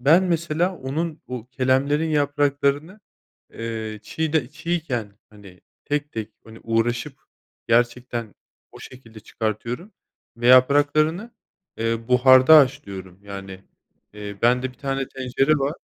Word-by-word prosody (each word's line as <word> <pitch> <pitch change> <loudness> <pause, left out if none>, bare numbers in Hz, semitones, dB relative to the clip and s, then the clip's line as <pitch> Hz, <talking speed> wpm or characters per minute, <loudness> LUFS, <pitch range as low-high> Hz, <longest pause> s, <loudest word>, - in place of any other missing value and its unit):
Ben 160 +8 +5
mesela 170 +1 0
onun, 150 +5 -4
bu, 125 -2 -6
kelemlerin 140 +5 +1
yapraklarını, 145 +4 0 0.5
eee, 110 -2 -5
çiğde 160 +1 -1
çiğken, 145 -10 -4
hani, 100 -4 -16 0.2
tek 145 0 -2
tek, 110 -2 -5
hani, 110 0 -13
uğraşıp 120 +4 -1 0.5
gerçekten 120 -1 0 0.4
o - - -13
şekilde 115 -4 -13
çıkartıyorum 115 - -4 0.4
ve 120 +1 -2
yapraklarını, 145 - +4 0.5
eee, 115 0 -2
buharda 130 +4 +7
haşlıyorum. 95 -9 -1
Yani, 95 -1 -9 0.5
eee, 105 -1 -7
bende 125 +2 +2
tane 135 0 -3
tencere 135 +3 0
var. 140 +3 -1
130 Hz, 110 wpm, -23 LUFS, 115-150 Hz, 0.5 s, buharda